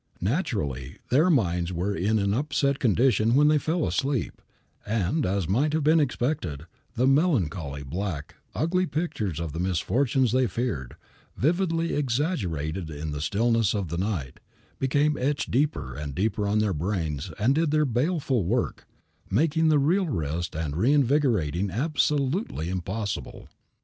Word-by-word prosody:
Naturally, 90 - -2
their 155 +8 +4
minds 90 - +1
were 90 +4 -1
in 105 +6 +1
an 100 -1 +1
upset 140 +1 0
condition 115 -1 +3
when 150 +2 +5
they 150 -1 +4
fell 160 +2 0
asleep, 135 -4 -1 0.4
and, 110 - 0
as 95 -3 -1
might 135 - +1
have 160 -1 +1
been 155 +2 +5
expected, 120 - -1 0.3
the 125 +2 +2
melancholy, 95 - +1
black, 80 +1 -4 0.2
ugly 180 +3 +1
pictures 110 - -2
of 80 -3 -4
the 80 - -4
misfortunes 115 - +1
they 130 0 +3
feared, 95 - -3 0.4
vividly 165 +2 +1
exaggerated 95 - -1
in 75 0 -5
the 75 0 -4
stillness 115 +4 +1
of 100 -5 -2
the 85 - -3
night, 90 -10 -3 0.4
became 145 +3 +2
etched 140 +3 -1
deeper 125 - 0
and 75 -1 -5
deeper 105 +2 0
on 105 +1 +1
their 105 -2 +1
brains 80 -4 -2
and 115 +6 +3
did 160 +1 +1
their 150 0 +3
baleful 135 - 0
work, 115 +8 -1 0.4
making 160 - +2
real 155 +6 +3
rest 85 - -3
and 75 -2 -3
reinvigoration 115 - +2
absolutely 140 - 0
impossible. 95 +3 -4
115 Hz, 140 wpm, -26 LUFS, 85-145 Hz, 0.4 s, when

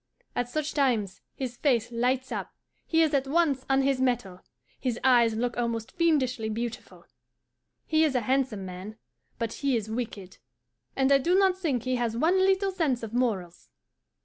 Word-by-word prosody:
At 245 0 -1
such 305 +3 -2
times 230 -9 0
his 250 -2 -5
face 240 -5 +1
lights 250 +2 0
up, - - -5 0.3
he 325 0 +4
is 310 -2 +1
at 275 -1 +1
once 285 -3 +1
on 270 0 +3
his 270 -1 +1
mettle, 240 -8 -1 0.4
his 245 -2 -2
eyes 240 -4 +4
look 240 +2 -1
almost 230 -2 -2
fiendishly 265 -10 +1
beautiful. 230 +2 -6 0.8
He 315 0 +3
is 300 -4 +1
a 250 - +2
handsome 255 -4 0
man, 185 +4 -8 0.4
but 230 -1 -3
he 275 -4 0
is 220 -1 -5
wicked, 220 -5 -5 0.6
and 265 0 +2
I 275 - +6
do 350 +7 +2
not 385 -2 +4
think 295 - -1
he 255 0 0
has 230 -2 -1
one 335 +8 +3
little 385 +1 +2
sense 300 -10 0
of 225 0 -6
morals. 205 -9 -2
250 Hz, 175 wpm, -27 LUFS, 230-285 Hz, 0.8 s, I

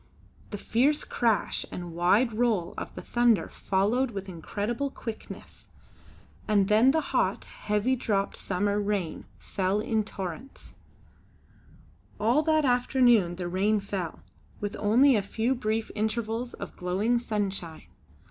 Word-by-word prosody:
The 205 - -5
fierce 270 +9 +1
crash 230 -4 0
and 175 -2 -6
wide 200 +8 +3
roll 215 -6 0
of - - -7
the - - -7
thunder 240 -7 +2
followed 215 +7 0
with 195 -3 -6
incredible 205 - -3
quickness. 225 -4 -9 0.8
And 200 -2 +3
then 220 +5 +5
the 315 +3 +3
hot, - - +1
heavy 210 +5 -1
dropped 205 -5 -1
summer 200 +2 -1
rain 200 -5 -2
fell 190 +1 -1
in 220 -1 0
torrents. 195 +5 -8 1.5
All 235 +8 +3
that 310 -1 +2
afternoon 245 -7 +3
the 175 0 -4
rain 200 +4 +1
fell, 195 -4 -5 0.4
with 205 -1 -4
only 245 +6 +5
a 210 - +2
few 225 +5 -1
brief 220 -3 -2
intervals 225 +2 -2
of - - -8
glowing 200 +7 0
sunshine. 195 -8 -3
215 Hz, 130 wpm, -27 LUFS, 195-240 Hz, 1.5 s, then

